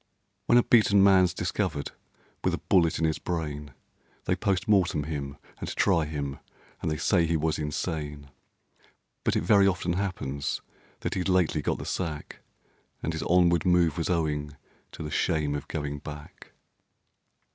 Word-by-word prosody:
When 120 - +6
a 120 - +6
beaten 100 -4 +5
man's 95 -3 +5
discovered 90 -4 -2 0.5
with - - +1
a - - -10
bullet 85 -4 +4
in 80 - +1
his 80 -1 0
brain, 75 -4 -4 0.5
They - - +1
POST 100 0 -1
MORTEM 90 -8 +3
him, 70 -2 -5 0.2
and - - -5
try 80 -2 +3
him, 70 -2 -4 0.4
and - - -1
they 75 - -1
say 85 0 +2
he 85 0 +1
was 80 0 0
insane; 75 -2 -4 0.9
But - - +1
it - - +1
very 100 +2 +5
often 90 -2 0
happens 80 -8 -2 0.4
that - - -2
he'd 95 0 -1
lately 90 -4 +2
got - - -1
the - - -7
sack, 80 -5 -4 0.6
And 80 - -1
his 80 - -3
onward 85 -1 +3
move 90 -4 +3
was 85 - -1
owing 75 -4 -1 0.4
to - - -7
the 75 - -5
shame 75 -2 0
of 75 - -4
going 75 -2 -4
back. 75 0 -11
80 Hz, 160 wpm, -27 LUFS, 75-90 Hz, 0.9 s, When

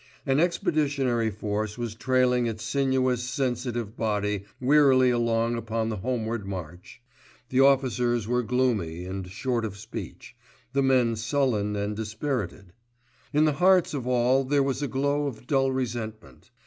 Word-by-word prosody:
An 135 0 +2
expeditionary 145 - +1
force 105 +1 -3
was 120 -3 -4
trailing 125 0 +2
its 110 -1 -4
sinuous, 130 0 +1
sensitive 125 -3 -2
body 105 -3 -1
wearily 130 -2 +5
along 115 -1 +1
upon 115 -1 -2
the 110 - -3
homeward 115 -1 -3
march. 90 +4 -8 0.5
The 130 - +1
officers 125 -4 +2
were 125 +1 +1
gloomy 110 -9 -1
and 95 0 -5
short 120 +4 -2
of 100 -3 -5
speech, 110 +2 -8 0.4
the 140 - +2
men 130 -4 +3
sullen 110 -3 0
and 105 +1 -2
dispirited. 110 - -4 0.6
In 150 +1 +3
the 155 - +2
hearts 185 -2 +4
of 130 -4 -3
all 125 +2 +3
there 140 +1 +2
was 135 0 -1
a 145 - -1
glow 145 +2 0
of 125 -3 -7
dull 135 -1 +2
resentment. 110 - -5
120 Hz, 145 wpm, -26 LUFS, 110-135 Hz, 0.6 s, wearily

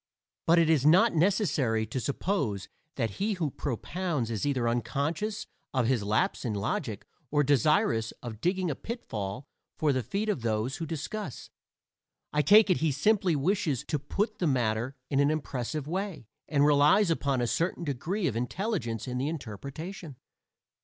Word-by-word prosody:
But 165 +1 +6
it 165 -1 +5
is 155 -5 +3
not 180 +10 +6
necessary 155 - +2
to 130 - -3
suppose 130 - -1 0.3
that 115 -5 -1
he 210 +2 +1
who 165 -7 -2
propounds 145 - -2
is 110 +5 -1
either 130 -4 +1
unconscious 155 - -1 0.3
of 130 -2 +2
his 125 -2 +2
lapse 105 +2 0
in 110 -4 -2
logic 100 0 -2 0.2
or 145 +1 +3
desirous 130 -5 +2
of 115 -3 -7
digging 180 -1 +1
a - - -3
pitfall 125 - -5 0.3
for 150 -2 +2
the 130 - 0
feet 200 - -2
of 205 - 0
those 115 +3 -1
who 165 - -4
discuss; 165 - -5 0.8
I 150 - +3
take 205 +4 +6
it 180 - +3
he 160 -1 +1
simply 190 +4 +2
wishes 155 - 0
to 150 - 0
put 210 - -2
the 175 - +1
matter 120 -1 0 0.2
in 140 - +2
an 140 0 +4
impressive 145 -1 -2
way, 185 - -3 0.2
and 145 -2 +3
relies 150 +6 +5
upon 140 -5 0
a 120 - +1
certain 165 - -1
degree 170 - -2
of 135 - 0
intelligence 125 - -2
in 125 0 -2
the 135 - 0
interpretation. 150 - -7
145 Hz, 165 wpm, -29 LUFS, 120-180 Hz, 0.8 s, But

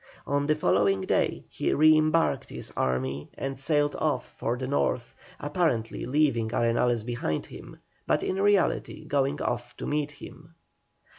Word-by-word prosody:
On 145 0 0
the 155 - +3
following 100 -9 +2
day - - 0
he - - -2
re 155 +1 +6
embarked 155 -3 +2
his - - -8
army 65 +2 -1
and 135 -1 -4
sailed 145 +1 +1
off 145 -5 -1
for 120 +2 -2
the 130 - -4
North, 125 -3 -1 0.3
apparently 145 -7 -1
leaving 125 -4 +2
Arenales 115 0 +1
behind 120 -11 -2
him, - - -11 0.3
but - - +2
in 190 +1 -1
reality 200 -5 +1
going 140 -1 0
off 120 0 -3
to - - -5
meet 150 0 -1
him. 160 +2 -13
140 Hz, 150 wpm, -27 LUFS, 120-155 Hz, 0.3 s, re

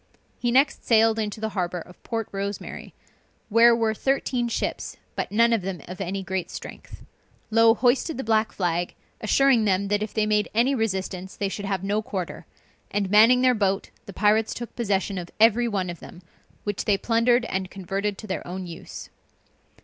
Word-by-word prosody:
He 240 - 0
next 270 +3 +3
sailed 225 -1 +4
into 210 -1 -3
the 220 0 -2
harbor 180 -3 -2
of 180 +2 -13
Port 225 -2 -3
Rosemary, 200 0 -5 0.5
where 230 +2 +6
were 225 -1 +1
thirteen 255 0 0
ships, 235 - -3 0.2
but - - -3
none 230 +2 +4
of 225 - +1
them 185 -4 -5
of 180 +3 -7
any 195 +1 -3
great 190 -1 -3
strength. - - -10 0.5
Low 225 0 +6
hoisted 255 +5 +1
the 265 - -3
black 220 0 +1
flag, 175 -2 -1 0.3
assuring 245 +1 +3
them 195 0 +1
that 205 0 +1
if 215 - -3
they 215 -1 +1
made 210 -1 +1
any 245 +5 +3
resistance 190 -5 -3
they 200 - -2
should 200 +1 -5
have 195 -1 -2
no 205 +2 0
quarter; 190 -5 -5 0.4
and 200 -2 -1
manning 230 +4 +6
their 255 -1 +5
boat, 195 -3 0 0.2
the - - -7
pirates 215 +3 +2
took 240 -1 -7
possession 200 -4 -1
of 175 -1 -7
every 230 +2 +5
one 195 -5 -1
of 170 - -10
them, 175 - -12 0.4
which 205 -1 -3
they 205 -2 +3
plundered 235 +3 +2
and 190 -3 -3
converted 195 +2 -3
to - - -9
their 190 -3 -4
own 185 +1 -5
use. 170 -2 -9
210 Hz, 185 wpm, -25 LUFS, 190-230 Hz, 0.5 s, where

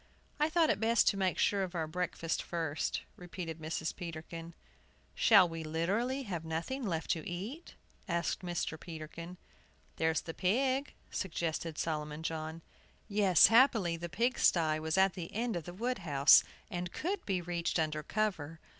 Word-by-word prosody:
"I 300 +1 +3
thought 320 -1 +3
it - - -1
best 225 0 +3
to - - -1
make 190 -2 0
sure 200 -1 +2
of 185 -1 -3
our 165 -2 0
breakfast 165 0 -2
first," 160 -3 -2 0.2
repeated 175 -2 -6
Mrs. 160 0 -3
Peterkin. 165 -1 -7 0.6
"Shall 200 -6 +6
we 165 -1 -6
literally 200 - -1
have 175 -8 -4
nothing 165 +12 -3
left 165 -4 -1
to 165 -1 -2
eat?" 215 - -6 0.3
asked 170 -2 -1
Mr. 175 -3 -3
Peterkin. 165 +1 -8 0.6
"There's 160 -1 +1
the 165 - -7
pig!" 260 - 0 0.2
suggested 165 -3 -3
Solomon 150 -1 -3
John. 160 0 -4 0.4
Yes, 200 -5 +6
happily, 225 -7 +5
the 170 +1 -6
pigsty 175 -7 +2
was 160 +2 -1
at 190 -1 +4
the 175 -3 -6
end 230 -1 -1
of 170 -3 -4
the - - -6
wood 240 +5 -2
house, 145 -5 +6 0.3
and 175 -1 -3
could 380 +5 -3
be 190 -3 +1
reached 175 0 -2
under 155 -2 0
cover. 165 -4 -2
175 Hz, 155 wpm, -33 LUFS, 160-205 Hz, 0.6 s, Shall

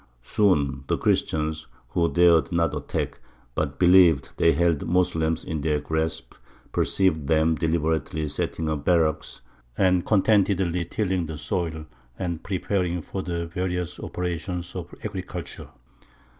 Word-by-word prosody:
Soon 70 - +1
the - - +1
Christians, 80 0 0 0.2
who 85 -1 +1
dared 85 -1 +4
not 85 -1 +1
attack, - - -3 0.3
but 70 0 -2
believed 90 -6 +5
they 85 - +5
held 85 -3 +2
the - - -6
Moslems 80 -3 +1
in 80 -2 -3
their 75 0 +1
grasp, 80 +1 -3 0.4
perceived 80 -7 +1
them 80 +1 +3
deliberately 80 -1 -1
setting 80 +2 -3
up 75 -2 -2
barracks, 80 -6 +1 0.4
and 90 -2 +3
contentedly 95 -4 +2
tilling 95 -2 -1
the 80 -1 -6
soil 80 +1 -3 0.3
and 85 -4 -3
preparing 90 -2 -1
for 95 +3 -5
the 85 -2 -3
various 90 +1 -3
operations 90 0 -4
of 85 -2 -6
agriculture. 95 -4 -6
85 Hz, 130 wpm, -25 LUFS, 80-90 Hz, 0.4 s, believed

